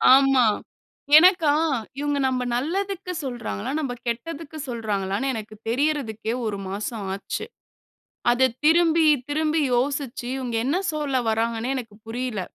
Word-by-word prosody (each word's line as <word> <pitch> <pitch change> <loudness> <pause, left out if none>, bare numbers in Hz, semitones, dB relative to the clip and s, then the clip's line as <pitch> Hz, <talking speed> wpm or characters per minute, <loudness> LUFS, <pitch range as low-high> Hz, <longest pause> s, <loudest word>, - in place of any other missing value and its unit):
ஆமா. 270 -2 +5 0.7
எனக்கா, 345 -2 +6 0.5
இவுங்க 290 0 0
நம்ம 255 -1 0
நல்லதுக்கு 370 +7 -2
சொல்றாங்களா? 240 -2 -4
நம்ம 275 -5 -2
கெட்டதுக்கு 310 +6 -4
சொல்றாங்களான்னே, 210 0 -2
எனக்கு 215 -1 -6
தெரியறதுக்கே, 240 -5 -1
ஒரு 210 -2 -2
மாசம் 210 +2 -4
ஆச்சு. 200 - -4 0.9
அதை 250 +2 +4 0.2
திரும்பி, 325 0 +5 0.2
திரும்பி 310 +2 +1
யோசிச்சு, 265 0 -1
இவுங்க 245 -3 -3
என்ன 285 +7 +1 0.2
சொல்ல 295 -3 -1
வராங்கன்னே 225 +1 0
எனக்கு 225 -5 -6
புரியல. 240 -2 -3
260 Hz, 115 wpm, -24 LUFS, 225-305 Hz, 0.9 s, எனக்கா